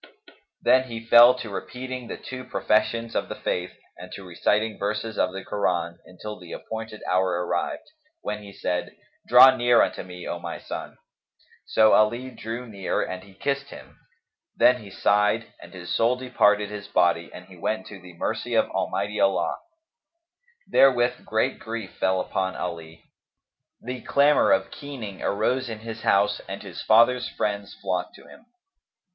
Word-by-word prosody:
Then 130 Hz, 0 st, +5 dB
he 115 Hz, -1 st, -7 dB
fell 120 Hz, +2 st, +8 dB
to 115 Hz, -4 st, -7 dB
repeating 125 Hz, +4 st, -6 dB
the -, -, -6 dB
two 130 Hz, 0 st, -8 dB
professions 115 Hz, -1 st, 0 dB
of -, -, -1 dB
the -, -, -4 dB
Faith 90 Hz, 0 st, -2 dB, 0.3 s
and 90 Hz, 0 st, -10 dB
to 100 Hz, -, -8 dB
reciting 105 Hz, +5 st, 0 dB
verses 105 Hz, +2 st, -2 dB
of 90 Hz, -, +1 dB
the 95 Hz, +1 st, -7 dB
Koran, 85 Hz, -4 st, -1 dB
until 105 Hz, +4 st, -8 dB
the 90 Hz, -2 st, -10 dB
appointed 110 Hz, -1 st, -7 dB
hour 90 Hz, -1 st, +1 dB
arrived, 85 Hz, 0 st, -2 dB, 0.4 s
when 105 Hz, 0 st, -4 dB
he 100 Hz, -1 st, -11 dB
said, 90 Hz, -2 st, -3 dB, 0.3 s
"Draw 130 Hz, +2 st, +9 dB
near 120 Hz, -1 st, +5 dB
unto -, -, -2 dB
me, 90 Hz, -1 st, -9 dB
O -, -, -4 dB
my -, -, -6 dB
son." -, -, -7 dB, 0.7 s
So 110 Hz, 0 st, +5 dB
Ali 120 Hz, +4 st, +2 dB
drew 115 Hz, +1 st, -6 dB
near 100 Hz, -4 st, -2 dB
and 95 Hz, 0 st, -6 dB
he 95 Hz, 0 st, -17 dB
kissed 140 Hz, +5 st, -2 dB
him; -, -, -13 dB, 0.6 s
then 125 Hz, -1 st, +5 dB
he 105 Hz, -, -11 dB
sighed 105 Hz, +3 st, +1 dB
and -, -, -12 dB
his 90 Hz, -2 st, -6 dB
soul 115 Hz, +2 st, +3 dB
departed 105 Hz, -5 st, +2 dB
his 105 Hz, -1 st, -7 dB
body 85 Hz, -3 st, +2 dB
and 90 Hz, -, -11 dB
he 95 Hz, -, -15 dB
went 95 Hz, +3 st, -2 dB
to 100 Hz, -3 st, -11 dB
the 90 Hz, 0 st, -13 dB
mercy -, -, -2 dB
of -, -, +2 dB
Almighty 100 Hz, +2 st, -2 dB
Allah.[FN#261] 335 Hz, -, -4 dB
Therewith 125 Hz, -2 st, +4 dB
great 110 Hz, +4 st, 0 dB
grief 110 Hz, -3 st, -6 dB
fell 95 Hz, 0 st, +2 dB
upon 95 Hz, +1 st, -2 dB
Ali; 80 Hz, -2 st, -6 dB, 0.8 s
the 125 Hz, 0 st, -6 dB
clamour 145 Hz, -, +4 dB
of 285 Hz, -, +2 dB
keening 125 Hz, -10 st, -8 dB
arose 120 Hz, +5 st, 0 dB
in 110 Hz, -1 st, -6 dB
his 115 Hz, 0 st, -7 dB
house 100 Hz, 0 st, +2 dB
and -, -, -6 dB
his -, -, -8 dB
father's 120 Hz, +3 st, +4 dB
friends 100 Hz, -1 st, -3 dB
flocked 90 Hz, -2 st, -3 dB
to -, -, -16 dB
him. 230 Hz, -, -16 dB
105 Hz, 165 wpm, -25 LUFS, 95-125 Hz, 0.8 s, Draw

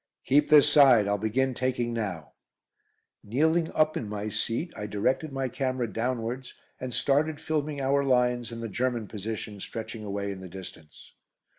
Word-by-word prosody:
"Keep 145 Hz, +2 st, +3 dB
this 150 Hz, -1 st, +8 dB
side, 135 Hz, -8 st, +6 dB
I'll 100 Hz, 0 st, +1 dB
begin 130 Hz, +5 st, +1 dB
taking 125 Hz, -1 st, -1 dB
now." 95 Hz, -9 st, -4 dB, 0.9 s
Kneeling 160 Hz, +9 st, +1 dB
up 155 Hz, 0 st, +2 dB
in 110 Hz, -, -3 dB
my 105 Hz, 0 st, -3 dB
seat, 120 Hz, -, -2 dB
I 105 Hz, -, -5 dB
directed 130 Hz, +9 st, 0 dB
my 135 Hz, -1 st, -2 dB
camera 130 Hz, 0 st, -1 dB
downwards 120 Hz, +3 st, -3 dB, 0.2 s
and 130 Hz, 0 st, -5 dB
started 145 Hz, +4 st, +1 dB
filming 150 Hz, -2 st, -2 dB
our 140 Hz, +1 st, +2 dB
lines 125 Hz, -2 st, +1 dB
and 115 Hz, 0 st, -6 dB
the -, -, -2 dB
German 120 Hz, +1 st, -1 dB
position 105 Hz, 0 st, -6 dB
stretching 110 Hz, +2 st, -6 dB
away 100 Hz, -1 st, -3 dB
in 95 Hz, -1 st, -7 dB
the 95 Hz, -, -8 dB
distance. 85 Hz, -4 st, -11 dB
120 Hz, 160 wpm, -28 LUFS, 105-135 Hz, 0.9 s, this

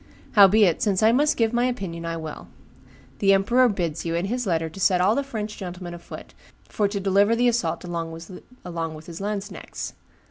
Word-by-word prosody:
Howbeit, 200 Hz, -3 st, +5 dB
since 200 Hz, 0 st, +1 dB
I 220 Hz, -, +6 dB
must 290 Hz, +5 st, +2 dB
give 225 Hz, 0 st, +1 dB
my 240 Hz, +1 st, +2 dB
opinion, 185 Hz, -10 st, -4 dB
I 165 Hz, 0 st, -3 dB
will. 160 Hz, -1 st, -7 dB, 0.7 s
The 195 Hz, -1 st, +4 dB
emperor 240 Hz, +6 st, +4 dB
bids 170 Hz, -6 st, -2 dB
you, 165 Hz, 0 st, -2 dB
in 170 Hz, +2 st, -1 dB
his 245 Hz, +2 st, -2 dB
letter, 165 Hz, -2 st, 0 dB
set 185 Hz, -1 st, +2 dB
all 190 Hz, +4 st, +4 dB
the 280 Hz, -, +1 dB
French 220 Hz, -6 st, -5 dB
gentlemen 180 Hz, -1 st, -7 dB
afoot 170 Hz, 0 st, -10 dB, 0.3 s
for 210 Hz, -, 0 dB
to 200 Hz, 0 st, -3 dB
deliver 200 Hz, +3 st, +3 dB
the 245 Hz, +1 st, +2 dB
assault 240 Hz, -3 st, 0 dB
along 170 Hz, -2 st, -4 dB
with 165 Hz, -2 st, -8 dB
his 170 Hz, +1 st, -8 dB
lanzknechts. 205 Hz, 0 st, -5 dB
195 Hz, 180 wpm, -24 LUFS, 170-220 Hz, 0.7 s, I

